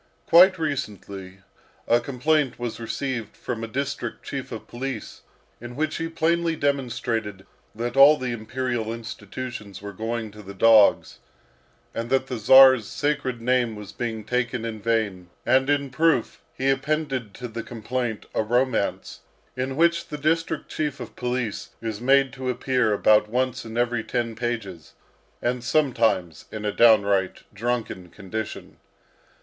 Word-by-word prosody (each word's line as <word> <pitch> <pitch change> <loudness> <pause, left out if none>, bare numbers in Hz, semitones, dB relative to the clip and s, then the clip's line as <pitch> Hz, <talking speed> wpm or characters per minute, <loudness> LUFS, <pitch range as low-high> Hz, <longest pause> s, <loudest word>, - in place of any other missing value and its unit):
Quite 185 +3 +7
recently, 100 - -5 0.5
a 120 - +4
complaint 140 +2 0
was 120 -1 -5
received 115 -1 -4
from 115 -2 -4
a - - -3
district 140 +4 -4
chief 135 -2 -5
of 110 - -7
police 135 +2 -6 0.4
in 120 +1 -9
which 155 +2 -1
he 165 - -2
plainly 165 0 +1
demonstrated 120 -8 -2 0.3
that 120 +2 -3
all 140 +3 +8
the 130 -2 -3
imperial 120 0 -3
institutions 115 -3 -7
were 100 0 -8
going 110 +2 -4
to 105 +1 -12
the 100 0 -10
dogs, 110 0 +5 0.7
and 115 +1 -4
that 130 0 +2
the 125 -3 -5
Czar's 130 0 +7
sacred 130 -5 -2
name 125 -2 +1
was 105 -2 -9
being 115 -3 -4
taken 125 +1 -1
in 110 -2 -5
vain; 105 -6 -1 0.2
and 130 +2 +3
in 140 -2 +1
proof 155 -3 +1
he 135 +1 +1
appended 135 -5 -2
to 125 - -6
the 115 0 -5
complaint 120 0 -4
a - - +1
romance, 120 0 0 0.4
in 130 +1 -3
which 170 +2 +2
the 150 - -6
district 160 +3 0
chief 150 -3 -3
of 120 -3 -8
police 125 -3 -3
is 110 -1 -5
made 135 0 +3
to 130 -1 -4
appear 125 -2 +1
about 105 +1 +4
once 125 +1 -1
in 115 +1 -7
every 120 -1 +1
ten 115 -1 -2
pages, 110 -8 -4 0.5
and 120 0 -1
sometimes 115 - +1
in 110 -1 -5
a 105 - +1
downright 100 -4 +3
drunken 110 -4 -3
condition. 105 +4 -6
120 Hz, 145 wpm, -24 LUFS, 110-135 Hz, 0.7 s, all